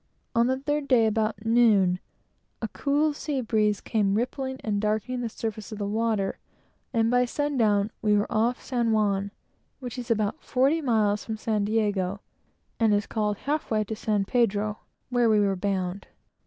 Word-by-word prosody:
On 235 0 +3
the 260 +1 +1
third 290 +1 -2
day, 245 -4 +4
about 220 0 -1
noon, 215 -6 +4 0.6
a 225 - -2
cool 295 +5 +1
sea 290 -1 -3
breeze 215 -4 +1
came 205 -3 +1
rippling 260 +3 -2
and 205 -2 -1
darkening 215 +4 -1
the 235 - -2
surface 220 -1 -5
of 215 - -6
the 205 - -3
water, 215 -1 -1 0.5
and 230 -2 +2
by 245 0 +4
sundown 230 -7 +1
we 210 -1 +3
were 205 - +1
off 230 +3 +1
San 240 -3 0
Juan's, 200 -2 +1 0.5
which 250 -1 -6
is 245 0 -7
about 215 -3 0
forty 275 +6 +2
miles 215 -6 +1
from 220 -1 -4
San 215 -2 0
Diego, 205 -3 0 0.6
and 220 -2 +4
is 205 0 0
called 210 -2 -1
half 300 +2 -2
way 215 -1 +1
to 220 +1 -5
San 210 -2 0
Pedro, 210 -2 +1 0.3
where 245 -2 +3
we 215 -1 +4
were 200 -1 +3
now - - +1 0.2
bound. 190 0 -3
220 Hz, 175 wpm, -26 LUFS, 205-245 Hz, 0.6 s, day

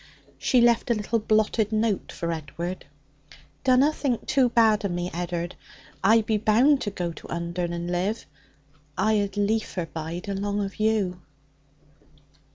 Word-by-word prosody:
She 250 - +3
left 235 0 +3
a 235 - +3
little 220 +2 -1
blotted 215 0 +1
note 215 -2 0
for 170 0 -3
Edward. 165 +2 -5 0.8
'Dunna 270 +3 +4
think 260 -6 -2
too 260 -3 +3
bad 220 -3 +4
of 200 - 0
me, 175 0 -3
Ed'ard. 175 0 -3 0.5
I 220 +3 +6
be 215 0 0
bound 245 +7 +4
to 210 - -1
go 180 -4 -3
to 160 - -12
Undern 170 +1 -3
and 170 0 -4
live; 190 +6 -1 0.7
I 215 -1 +2
ud 200 0 -4
liefer 205 -3 0
bide 165 +3 -6
along 200 +1 -1
of 195 - -9
you.' 210 -5 +1
205 Hz, 150 wpm, -25 LUFS, 175-220 Hz, 0.8 s, I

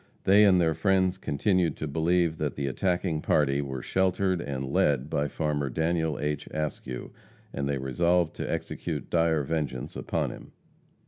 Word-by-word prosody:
They 100 +2 +6
and 95 -3 +5
their 80 -2 +3
friends 95 0 +1
continued 90 +2 +1
to 80 - -3
believe 80 +2 +1
that 75 -2 -2
the 70 - -2
attacking 90 +2 0
party 70 -2 +2
were 65 -3 -5
sheltered 95 -1 +1
and 70 -2 -4
led 70 +1 +1
by 70 0 +1
farmer 75 -1 -1
Daniel 80 +2 0
H. 75 0 -2
Askew, 75 -5 -4 0.4
and 70 0 -2
they 70 - 0
resolved 85 +6 +1
to - - -3
execute 75 -5 -4
dire 80 -3 +2
vengeance 70 -4 -3
upon - - -2
him. - - -12
80 Hz, 155 wpm, -27 LUFS, 70-90 Hz, 0.4 s, They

